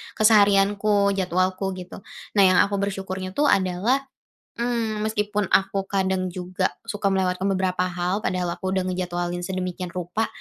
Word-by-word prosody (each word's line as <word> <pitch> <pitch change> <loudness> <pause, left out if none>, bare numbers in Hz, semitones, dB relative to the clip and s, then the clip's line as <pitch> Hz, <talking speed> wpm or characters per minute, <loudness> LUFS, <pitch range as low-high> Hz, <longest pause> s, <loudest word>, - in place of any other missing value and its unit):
keseharianku, 205 -1 +4
jadwalku, 185 +1 0
gitu. 180 +1 -9 0.4
Nah, 200 - +7
yang 185 - +5
aku 200 0 +1
bersyukurnya 190 -1 -4
tuh 290 0 +3
adalah, 190 +8 +2 0.6
mmm, 230 -3 -1
meskipun 210 -2 -1
aku 195 0 +2
kadang 190 -1 0
juga 185 +1 -2 0.2
suka 205 -1 -2
melewatkan 185 -1 0
beberapa 185 -1 0
hal, 180 +2 -1
padahal 180 -1 -1
aku 190 0 -3
udah 190 -1 +1
ngejadwalin 175 -1 -3
sedemikian 180 -1 -4
rupa, 180 +5 -2
190 Hz, 140 wpm, -24 LUFS, 185-205 Hz, 0.6 s, Nah